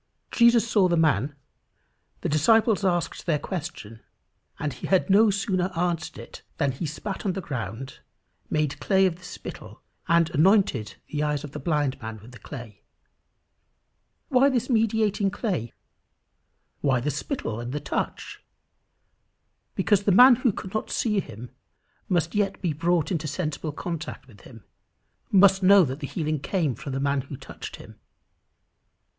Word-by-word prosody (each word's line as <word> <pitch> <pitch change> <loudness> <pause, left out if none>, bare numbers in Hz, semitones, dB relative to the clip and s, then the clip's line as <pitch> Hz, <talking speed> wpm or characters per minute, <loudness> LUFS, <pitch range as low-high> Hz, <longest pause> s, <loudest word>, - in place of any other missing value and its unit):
Jesus 235 -1 +5
saw 205 -4 +3
the 170 -1 +1
man, 145 -3 +2 0.9
the - - -1
disciples 215 +7 +3
asked 175 -2 -1
their 155 -3 +2
question, 150 - -6 0.6
and 150 -2 -3
he - - -7
had 190 +1 +2
no 215 +3 +6
sooner 195 -2 0
answered 170 -2 -1
it, - - -10 0.2
than 140 -3 +1
"he 135 +6 -4
spat 190 +6 -5
on 195 - 0
the 195 - -4
ground, 130 - -6 0.5
made 150 -2 -1
clay 190 -1 +3
of 175 -3 0
the 185 - -19
spittle, - - -10 0.2
and 170 -1 +3
anointed 155 - +2 0.2
the 150 - -1
eyes 150 -1 -1
of 145 - -8
the - - -6
blind 145 -3 -1
man 110 -1 -6
with 110 +4 -14
the 120 - -13
clay." 120 -7 -10 1.5
Why 270 0 +5
this 255 -1 -1
mediating 220 -3 +2
clay? 190 - -3 1.1
Why 130 -3 +2
the 145 +5 -1
spittle 130 - -4
and 120 +1 -5
the 150 - -2
touch? 145 - -4 1.3
Because 205 -2 +2
the 205 - +4
man 245 +5 +8
who 250 -2 +2
could 190 0 -8
not 215 - -2
see 210 -4 0
him 120 - -8 0.6
must 170 -3 +1
yet 200 -2 0
be 175 -5 -1
brought 170 +2 0
into 160 -3 -2
sensible 155 0 -3
contact 165 -1 -6
with 105 -6 -17
him 115 -5 -14 0.7
must 195 0 +6
know 195 -1 +7
that 135 +1 -5
the 140 - -5
healing 155 -2 -2
came 155 -1 -1
from 135 +3 -7
the 135 - -2
man 140 0 +1
who 140 +1 -9
touched - - -9
him. - - -14
165 Hz, 160 wpm, -25 LUFS, 140-195 Hz, 1.5 s, man